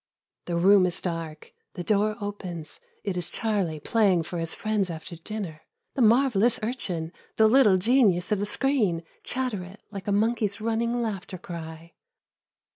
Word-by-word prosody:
The 175 Hz, -, -2 dB
room 185 Hz, +2 st, +5 dB
is 180 Hz, -, -3 dB
dark. 165 Hz, -3 st, -5 dB, 0.2 s
The 175 Hz, -, -4 dB
door 210 Hz, +3 st, +2 dB
opens. 185 Hz, -6 st, -6 dB, 0.2 s
It 195 Hz, -3 st, -2 dB
is 175 Hz, -, 0 dB
Charlie 195 Hz, -8 st, -1 dB
playing 190 Hz, 0 st, +2 dB
for 175 Hz, +1 st, -5 dB
his 165 Hz, -1 st, -3 dB
friends 215 Hz, -3 st, -1 dB
after 170 Hz, +1 st, -6 dB
dinner, 170 Hz, -3 st, -6 dB, 0.2 s
" -, -, -54 dB
the 270 Hz, -, -1 dB
marvelous 235 Hz, -1 st, +4 dB
urchin, 180 Hz, -9 st, -3 dB, 0.2 s
the 220 Hz, -, +5 dB
little 220 Hz, -5 st, +6 dB
genius 195 Hz, -4 st, +3 dB
of 210 Hz, -, +2 dB
the 205 Hz, -, -1 dB
screen," 210 Hz, -9 st, +1 dB, 0.2 s
(chatter 250 Hz, -7 st, -2 dB
it 190 Hz, +4 st, -13 dB
like 195 Hz, -1 st, -7 dB
a -, -, +1 dB
monkey's 210 Hz, 0 st, +1 dB
running 230 Hz, +2 st, 0 dB
laughter 195 Hz, -4 st, -4 dB
cry.) 165 Hz, -1 st, -8 dB
200 Hz, 160 wpm, -26 LUFS, 175-220 Hz, 0.2 s, little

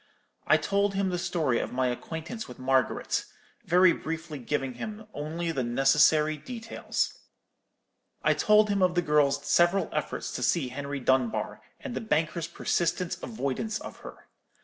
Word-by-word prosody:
I -, -, +6 dB
told 200 Hz, 0 st, 0 dB
him 195 Hz, -1 st, +1 dB
the 180 Hz, -, -1 dB
story 155 Hz, -9 st, 0 dB
of -, -, -3 dB
my 130 Hz, +1 st, 0 dB
acquaintance 160 Hz, -, -5 dB
with 125 Hz, -, -10 dB
Margaret, 130 Hz, -2 st, +1 dB, 0.4 s
very 180 Hz, +1 st, +6 dB
briefly 160 Hz, -2 st, -5 dB
giving 135 Hz, +1 st, -2 dB
him 210 Hz, -, -7 dB
only 165 Hz, +3 st, -3 dB
the 135 Hz, -5 st, -1 dB
necessary 150 Hz, +5 st, +4 dB
details. 225 Hz, -, -3 dB, 1.0 s
I -, -, +4 dB
told 210 Hz, 0 st, +4 dB
him 200 Hz, -1 st, +1 dB
of 180 Hz, -1 st, +3 dB
the 175 Hz, -, +2 dB
girl's 150 Hz, -3 st, +2 dB
several 175 Hz, +3 st, +3 dB
efforts -, -, -3 dB
to -, -, -4 dB
see 145 Hz, -7 st, +1 dB
Henry 140 Hz, +2 st, -4 dB
Dunbar, 125 Hz, -4 st, 0 dB, 0.2 s
and 265 Hz, -4 st, -6 dB
the -, -, -2 dB
banker's 165 Hz, -5 st, 0 dB
persistent 175 Hz, +1 st, -1 dB
avoidance 215 Hz, -, -3 dB
of -, -, -9 dB
her. -, -, -12 dB
160 Hz, 150 wpm, -28 LUFS, 135-190 Hz, 1.0 s, I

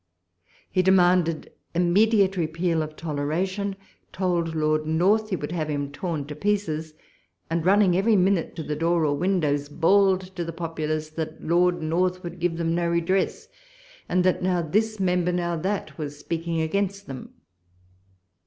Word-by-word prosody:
He 185 Hz, -, +3 dB
demanded 180 Hz, -3 st, +3 dB, 0.2 s
immediate 195 Hz, +3 st, +3 dB
repeal 165 Hz, 0 st, 0 dB
of 155 Hz, 0 st, -5 dB
toleration, 175 Hz, +7 st, -2 dB, 0.4 s
told 175 Hz, -3 st, -1 dB
Lord 155 Hz, 0 st, +1 dB
North 195 Hz, +7 st, +2 dB
he 190 Hz, -, 0 dB
would 150 Hz, -2 st, -5 dB
have 160 Hz, -3 st, -2 dB
him 145 Hz, -1 st, -2 dB
torn 155 Hz, -1 st, -3 dB
to 150 Hz, +1 st, -7 dB
pieces, 160 Hz, -4 st, -1 dB, 0.6 s
and, 165 Hz, 0 st, 0 dB
running 190 Hz, 0 st, +4 dB
every 210 Hz, +4 st, +3 dB
minute 190 Hz, -2 st, +2 dB
to 165 Hz, -, -5 dB
the 150 Hz, 0 st, -3 dB
door 165 Hz, +1 st, +1 dB
or 145 Hz, -1 st, +1 dB
windows, 150 Hz, -4 st, 0 dB
bawled 190 Hz, +4 st, +3 dB
to 175 Hz, -, -2 dB
the 165 Hz, -, -4 dB
populace 155 Hz, -2 st, -3 dB
that 155 Hz, 0 st, -5 dB
Lord 175 Hz, +1 st, +2 dB
North 180 Hz, +3 st, 0 dB
would 175 Hz, 0 st, -7 dB
give 170 Hz, -1 st, 0 dB
them 165 Hz, -1 st, 0 dB
no 170 Hz, 0 st, 0 dB
redress, 185 Hz, -, 0 dB, 0.6 s
and 180 Hz, 0 st, +2 dB
that 185 Hz, 0 st, +2 dB
now 180 Hz, -1 st, +1 dB
this 215 Hz, +6 st, 0 dB
member, 180 Hz, -1 st, +1 dB
now 175 Hz, -1 st, -1 dB
that, 190 Hz, +5 st, -3 dB
was 145 Hz, -1 st, -5 dB
speaking 165 Hz, +2 st, -2 dB
against 200 Hz, +4 st, -1 dB
them. 135 Hz, -2 st, -9 dB
170 Hz, 155 wpm, -25 LUFS, 155-185 Hz, 0.6 s, running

